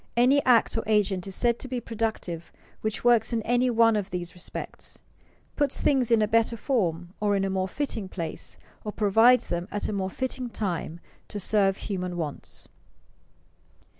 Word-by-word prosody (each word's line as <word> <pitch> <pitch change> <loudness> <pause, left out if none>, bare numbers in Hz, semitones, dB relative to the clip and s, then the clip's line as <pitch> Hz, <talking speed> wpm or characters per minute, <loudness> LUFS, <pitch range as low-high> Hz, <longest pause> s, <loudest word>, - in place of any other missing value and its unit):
Any 265 +4 +5
act 245 -3 +4
or 225 - 0
agent 200 -4 +1
is 195 - -4
said 235 -1 +1
to - - -7
be 255 -1 -2
productive 220 -8 -4 0.3
which 215 0 -3
works 240 -1 +4
in 225 -1 0
any 245 +2 +2
one 230 -1 +4
of 205 -2 -2
these 175 -1 -4
respects: 180 - -8 0.6
puts 290 -3 +1
things 265 -5 +2
in 225 -2 +4
better 230 +1 +2
form, 180 - -1
or 205 -1 +2
in 195 0 +1
a 195 - -1
more 190 0 0
fitting 225 -4 -3
place, 165 -4 -5 0.3
or 210 - -4
provides 225 +5 +5
them 175 +1 -2
at 205 - -2
a - - -2
more 190 -1 -1
fitting 255 +3 -3
time 175 -6 -3 0.3
to 205 - -5
serve 195 0 +2
human 180 -3 -4
wants. 150 -4 -5
215 Hz, 170 wpm, -27 LUFS, 190-235 Hz, 0.6 s, Any